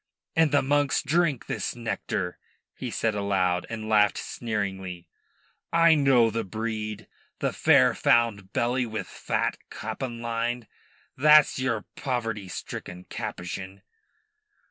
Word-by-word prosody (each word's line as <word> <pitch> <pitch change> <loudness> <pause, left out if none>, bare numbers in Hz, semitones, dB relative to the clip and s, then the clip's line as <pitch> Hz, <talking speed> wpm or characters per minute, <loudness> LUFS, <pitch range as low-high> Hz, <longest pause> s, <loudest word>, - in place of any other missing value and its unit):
"And 160 -2 +4
the 145 - +3
monks 145 +1 +2
drink 155 -3 +1
this - - -3
nectar?" 115 -6 -3 0.3
he - - -5
said 110 -1 0
aloud, 95 -3 0
and 110 -1 -5
laughed 105 -1 +4
sneeringly. 95 -6 -4 0.6
"I 165 0 +6
know 135 -6 +4
the 115 +1 -1
breed 110 0 -4 0.3
the - - -1
fair - - +5
found 110 -5 +2
belly 120 +3 0
wi' 110 -3 -3
fat - - -2
capon 115 +2 -5
lined. 115 0 -2 0.5
Tha's 150 0 +6
your 115 -5 -1
poverty 115 -7 -2
stricken 90 0 -7
Capuchin." 95 +2 -6
115 Hz, 120 wpm, -26 LUFS, 100-130 Hz, 0.6 s, I